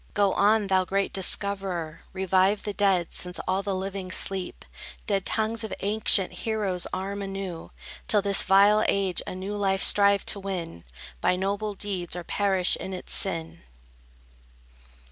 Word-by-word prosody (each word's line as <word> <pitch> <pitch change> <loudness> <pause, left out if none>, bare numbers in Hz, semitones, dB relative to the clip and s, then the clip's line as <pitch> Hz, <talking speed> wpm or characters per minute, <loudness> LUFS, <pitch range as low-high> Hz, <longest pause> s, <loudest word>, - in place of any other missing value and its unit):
Go 200 -2 +2
on, 210 +1 +3
thou 190 -1 +2
great 195 +2 -2
discoverer! 190 -4 -2
Revive 190 +2 +1
the 205 - -4
dead, 195 -4 +1
since 180 0 -1
all 190 +1 0
the 200 -1 -3
living 190 0 -5
sleep! 185 0 -3 0.4
Dead 195 -3 -1
tongues 225 +1 -1
of 220 - -6
ancient 205 -1 +2
heroes 205 -5 -2
arm 200 +2 -4
anew; 195 -4 -6 0.4
Till 210 -2 +3
this 200 -1 +3
vile 200 +3 +4
age 195 -2 0
a - - -5
new 195 +3 -5
life 195 -1 0
strive 200 -1 +7
to 200 - -2
win 180 - -6 0.4
By - - +2
noble 200 +2 -3
deeds, 185 -4 -4
or 175 - -5
perish 190 -1 +2
in 190 - -7
its 185 - -4
sin! 165 -4 -2
195 Hz, 150 wpm, -26 LUFS, 185-200 Hz, 0.4 s, strive